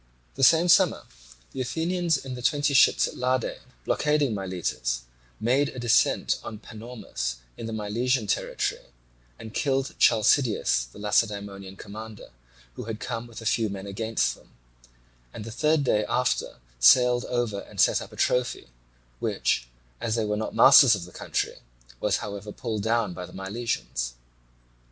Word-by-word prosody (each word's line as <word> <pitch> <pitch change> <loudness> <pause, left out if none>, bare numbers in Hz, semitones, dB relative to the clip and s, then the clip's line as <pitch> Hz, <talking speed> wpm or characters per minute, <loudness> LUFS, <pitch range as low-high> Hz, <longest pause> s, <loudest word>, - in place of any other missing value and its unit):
The - - -3
same 165 +5 +6
summer 175 - +4 0.5
the 130 - -4
Athenians 165 +5 0
in 135 -1 -7
the 125 - -7
twenty 145 +2 +1
ships 135 - +5
at - - -8
Lade, 125 -1 -1 0.3
blockading 150 -4 +1
Miletus, 90 -11 -2 0.4
made 130 +6 +2
a - - -10
descent 120 -2 +2
at 110 -1 -8
Panormus 110 - -5 0.2
in 115 - -7
the - - -5
Milesian 110 +3 -1
territory, - - -1 0.6
and 110 0 -10
killed 135 -2 0
Chalcideus 110 - +3
the - - -15
Lacedaemonian 100 -2 -1
commander, 110 +1 -10 0.4
who - - -7
had 110 -1 -5
come 120 -1 -5
with 115 -1 -10
a - - -11
few 110 0 +1
men 100 0 -6
against 110 +3 -1
them, - - -19 0.9
and 105 - -7
the 115 - -7
third 150 +5 +2
day 105 -5 +2
after 125 - 0 0.2
sailed 125 - +5
over 120 -5 -1
and - - -11
set - - +4
up - - -9
a - - -12
trophy, 125 - 0 0.5
which, - - 0 0.3
as 110 - -1
they 115 -2 0
were 105 0 -1
not 110 +1 -4
masters 135 -4 +8
of 90 -3 -6
the 90 - -14
country, - - -3 0.4
was 105 -1 +1
however 100 0 -7
pulled 110 -2 -4
down 110 -3 0
by 90 0 -7
the - - -15
Milesians. 95 - -3
115 Hz, 155 wpm, -26 LUFS, 100-125 Hz, 0.9 s, masters